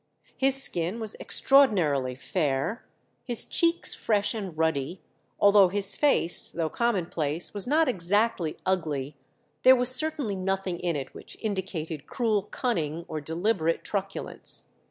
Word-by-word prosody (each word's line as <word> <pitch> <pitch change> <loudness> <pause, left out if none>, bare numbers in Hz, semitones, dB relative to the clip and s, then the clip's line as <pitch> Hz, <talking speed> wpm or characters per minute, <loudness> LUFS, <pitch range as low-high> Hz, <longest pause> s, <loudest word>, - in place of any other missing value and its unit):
His 270 0 +7
skin 180 -3 +1
was 220 -2 0
extraordinarily 165 - +2
fair, 145 - -3 0.4
his 240 -4 0
cheeks 335 0 0
fresh 205 -2 0
and 195 -7 -6
ruddy; 160 +1 -2 0.4
altogether 200 -2 +5
his 200 -1 +2
face, 280 - +4
though 165 -2 -3
commonplace, 175 -8 -1
was 205 0 +3
not 310 +3 +2
exactly 195 -4 0
ugly; 155 -7 -2 0.5
there 260 0 +7
was 250 0 -1
certainly 290 -6 -1
nothing 190 -1 -3
in 175 -2 -2
it 135 -2 -6
which - - -11
indicated 180 -8 -5
cruel 225 -5 0
cunning 170 -7 -3
or 155 - -5
deliberate 165 +2 -1
truculence. 195 -1 -4
190 Hz, 130 wpm, -26 LUFS, 160-225 Hz, 0.5 s, His